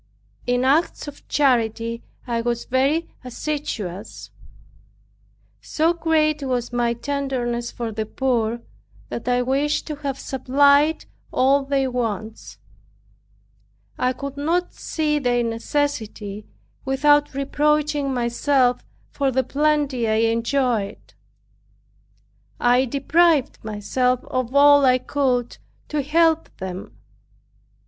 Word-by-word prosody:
In 245 +1 +1
acts 300 +4 +1
of 290 0 -11
charity 230 -4 +1 0.2
I 235 -2 -1
was 235 0 -2
very 275 +6 +1 0.2
assiduous. 240 - -5 1.3
So 325 +2 +1
great 310 -2 +1
was 250 -3 -2
my 240 -1 +1
tenderness 245 -3 -2
for 235 -2 -5
the 215 0 -4
poor, 235 -2 -1 0.5
that 235 - -6
I 245 0 +2
wished 280 +4 0
to 305 -2 -5
have 280 -2 -4
supplied 280 +4 +2 0.3
all 275 +2 +3
their 270 -1 0
wants. 225 -3 -4 1.4
I 255 - +2
could 280 +2 -7
not 335 +5 0
see 300 -2 -1
their 245 -3 +1
necessity 225 -4 -3 0.4
without 290 +1 +3
reproaching 295 0 +1
myself 250 +1 +1 0.3
for 275 -2 0
the 260 0 +1
plenty 285 -3 0
I 225 +1 +2
enjoyed. 230 -3 -1 1.5
I 245 +2 +3
deprived 290 +3 +2
myself 240 +4 0
of 255 0 -3
all 285 0 +7
I 255 -1 +5
could 255 -3 -1 0.3
to 300 -1 0
help 325 +3 +2
them. 185 -1 -7
265 Hz, 105 wpm, -22 LUFS, 235-290 Hz, 1.5 s, all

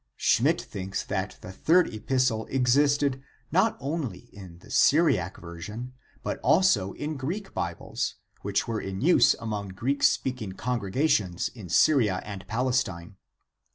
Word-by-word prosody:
Schmidt - - +3
thinks 95 0 -5
that 95 0 -3
the 90 - -8
third 165 - +3
epis 130 +4 +1
tle 110 -1 -4
existed 140 +1 +2 0.3
not 195 +6 +2
only 135 - -4
in 95 -4 -11
the 85 - -16
Syriac 140 - +3
version, 105 +9 -8 0.3
but - - -3
also 105 - +3
in 150 0 -4
Greek 175 +10 -4
Bibles 85 -1 -3 0.3
which - - -1
were 115 -2 -2
in 95 +1 -5
use 175 +5 +5
among 105 -3 -4
Greek 125 +9 -2
speaking 125 -7 +1
con 125 +4 -2
gregations 100 - 0
in 100 -7 -9
Syria 105 - +4
and 100 -2 -8
Palestine. 115 -7 -1
115 Hz, 140 wpm, -27 LUFS, 95-140 Hz, 0.3 s, use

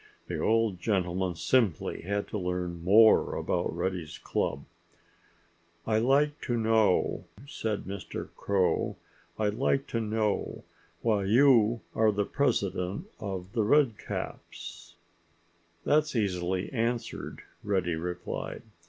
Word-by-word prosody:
The - - -4
old 110 -4 +2
gentleman 90 -2 0
simply 90 - +1
had 100 +3 -2
to - - -3
learn 90 -2 -3
more 110 +5 +6
about 85 -2 -1
Reddy's 90 -3 -3
club. 70 +1 -2 1.2
"I'd 110 0 +2
like 145 +4 +2
to 120 -2 -1
knew—" 110 -3 +2 0.2
said 110 -6 -3
Mr. 100 0 -6
Crow—"I'd 100 +2 -1
like 135 +3 +1
to 115 - -1
know 110 -1 -1 0.4
why 105 -4 +2
you 115 0 +5
are 110 -1 +3
the 105 0 0
president 100 - -1
of 95 -3 -5
The 115 - +1
Redcaps." 120 0 -1 0.9
"That's 150 -1 +2
easily 95 -2 -1
answered," 115 -1 -2 0.2
Reddy 95 -4 0
replied. 90 +2 -5
105 Hz, 110 wpm, -29 LUFS, 90-115 Hz, 1.2 s, more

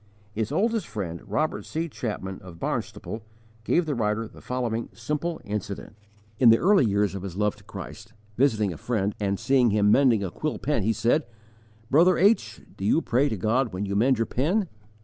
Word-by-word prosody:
His 110 +1 -3
oldest 225 -1 +1
friend, 95 -6 -5
Robert 115 +10 -1
C. 165 +2 -3
Chapman 105 - -5
of 90 -3 -11
Barnstaple, 110 +5 -4 0.4
gave 170 +9 +2
the 150 - -1
writer 110 -2 -1
the - - -15
following 120 -2 -2
simple 150 +7 -3
incident: 100 0 -5 0.4
In 125 - +7
the 115 - +7
early 190 - +4
days 100 -1 +1
of 100 - -5
his 95 -2 -6
love 105 0 +1
to 105 - -18
Christ, 105 +3 -9 0.2
visiting 110 -7 +2
a - - -9
friend, 105 -2 -1
and 100 -2 -1
seeing 125 0 +3
him 105 0 +3
mending 120 -5 +4
a 95 - -3
quill 155 - -3
pen, 145 -6 0
he 110 +3 +1
said: 115 +6 +1 0.6
"Brother 170 +6 +5
H, 170 - +2
do - - -8
you 135 +11 +3
pray 135 +4 +2
to 110 - -3
God 115 +3 +1
when 95 +3 -2
you 100 0 -3
mend 125 +5 +3
your 115 - +1
pen?" 180 - 0
115 Hz, 190 wpm, -26 LUFS, 105-140 Hz, 0.6 s, In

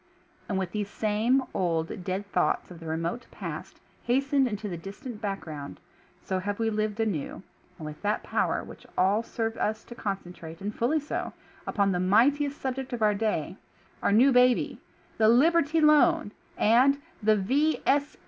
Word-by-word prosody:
And 195 - 0
with 190 -2 -2
these 205 -2 -3
same 220 +6 +1
old, 165 0 -1
dead 190 +2 -3
thoughts 180 - 0
of 170 - -10
the 165 - -9
remote 165 +9 -3
past - - -7 0.2
hastened 270 +2 +2
into 210 -2 -4
the 180 - -4
distant 210 - -8
background, 160 - -5 0.4
so 190 - -1
have 205 +2 -3
we 225 -1 0
lived 215 0 -2
anew, 195 -6 -2 0.3
and 160 - -8
with 150 0 -8
that 210 +1 0
power - - 0
which - - -12
will 195 +4 +3
serve 225 -1 -3
us 215 +1 -1
to - - -11
concentrate, 180 -6 -6
and 205 +2 -4
fully 265 +9 +1
so, 295 - -4 0.3
upon 200 -2 +1
the 180 - 0
mightiest 275 +10 +3
subject 265 -1 -4
of 230 -2 -1
our 210 -1 +4
day 200 -5 -2 0.2
— - - -32
Our - - +2
New 245 +7 +6
Baby— 250 0 +3 0.4
the 220 0 +5
"Liberty 320 +5 +4
Loan" 305 -4 +4 0.3
and 255 +6 +4 0.2
the 215 0 +4
"V. 275 +11 +1
215 Hz, 165 wpm, -27 LUFS, 190-250 Hz, 0.4 s, New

